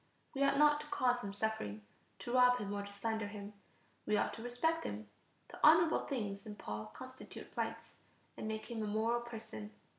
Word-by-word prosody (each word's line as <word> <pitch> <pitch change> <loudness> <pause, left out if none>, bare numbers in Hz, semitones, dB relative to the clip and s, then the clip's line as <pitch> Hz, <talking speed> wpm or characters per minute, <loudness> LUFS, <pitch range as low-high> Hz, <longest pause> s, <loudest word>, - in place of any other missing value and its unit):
We 275 - +1
ought 275 0 +4
not 295 0 +6
to 300 - -10
cause 250 -4 +2
him 200 - -3
suffering, 200 - -2 0.3
to 240 - -5
rob 250 -1 +7
him, 205 -4 -3
or 205 - -1
to 200 - -8
slander 220 +1 -2
him; 205 0 -7 0.5
we 210 - +3
ought - - +1
to - - -7
respect 285 +8 0
him. 105 +1 -4 0.4
The - - -10
honorable 320 +1 +6
things 205 -7 -2
in 210 - -6
Paul 105 - -5
constitute 260 0 -10
rights, - - -3 0.4
and - - -5
make 220 +2 -4
him 225 -2 -2
a 215 - -1
moral 225 +3 +1
person. 220 - -7
220 Hz, 190 wpm, -36 LUFS, 205-250 Hz, 0.5 s, rob